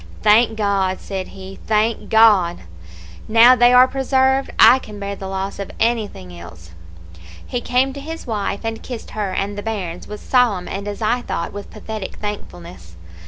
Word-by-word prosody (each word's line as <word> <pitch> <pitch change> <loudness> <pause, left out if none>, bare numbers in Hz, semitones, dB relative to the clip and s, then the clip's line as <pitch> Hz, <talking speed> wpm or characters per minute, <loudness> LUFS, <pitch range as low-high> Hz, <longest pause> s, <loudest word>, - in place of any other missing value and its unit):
"'Thank 220 +1 +4
God!' 195 -3 0
said 190 -2 -5
he, 190 0 -11
'thank 220 +1 0
God! 210 -6 +4 0.7
Now 230 +3 +7
they 245 0 +5
are 250 +1 +7
preserved, 265 0 +1
I 260 - +7
can 210 -4 -11
bear 200 0 -4
the 195 - -8
loss 195 +1 -4
of 200 - -5
anything 215 - -2
else!' 85 -1 -13 0.7
"He 245 - -4
came 255 +3 +1
to 280 - -8
his 320 +3 -8
wife, 205 -4 -3
and 225 0 -4
kissed 245 -3 -8
her 210 -3 -3
and 195 +2 -3
the 205 - -5
bairns 195 -6 -5
with 210 0 -8
solemn, 235 -8 +1
and, 200 +1 -5
as 205 +2 -5
I 240 +3 +1
thought, 170 - -4
with 205 0 -8
pathetic 215 -2 -7
thankfulness. 90 - -8
210 Hz, 170 wpm, -19 LUFS, 195-240 Hz, 0.7 s, Now